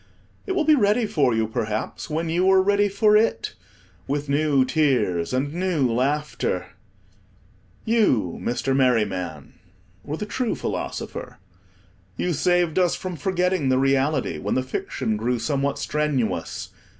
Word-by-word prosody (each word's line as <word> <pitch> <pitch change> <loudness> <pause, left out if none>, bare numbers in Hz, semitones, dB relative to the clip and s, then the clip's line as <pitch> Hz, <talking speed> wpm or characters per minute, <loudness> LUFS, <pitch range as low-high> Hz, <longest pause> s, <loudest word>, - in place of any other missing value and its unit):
It 380 - 0
will 365 -4 +1
be 310 - +5
ready 220 -3 +3
for 140 - +1
you, 110 0 +1
perhaps, 110 +6 -3
when 160 +2 -2
you 175 +3 +2
are 190 0 +6
ready 205 +1 +3
for 210 +2 +3
it, 220 +2 +1 0.5
with 145 +1 -2
new 140 -2 +3
tears 125 - +1
and 135 +3 -1
new 175 -6 +1
laughter. 145 +5 -1 1.2
You, 165 - +2
Mr. 130 +2 -1
Merryman, 100 - 0 0.4
were 150 +2 -4
the 210 - -4
true 235 +2 -2
philosopher. - - -5 0.8
You 180 - 0
saved 175 +2 +2
us 180 -2 +2
from 185 -1 -5
forgetting 180 -4 0
the 130 - +3
reality 135 - +1
when - - -2
the 130 - +1
fiction 110 -4 -3
grew 120 +3 0
somewhat 140 +4 -1
strenuous. 150 -6 -2
150 Hz, 140 wpm, -23 LUFS, 125-185 Hz, 1.2 s, are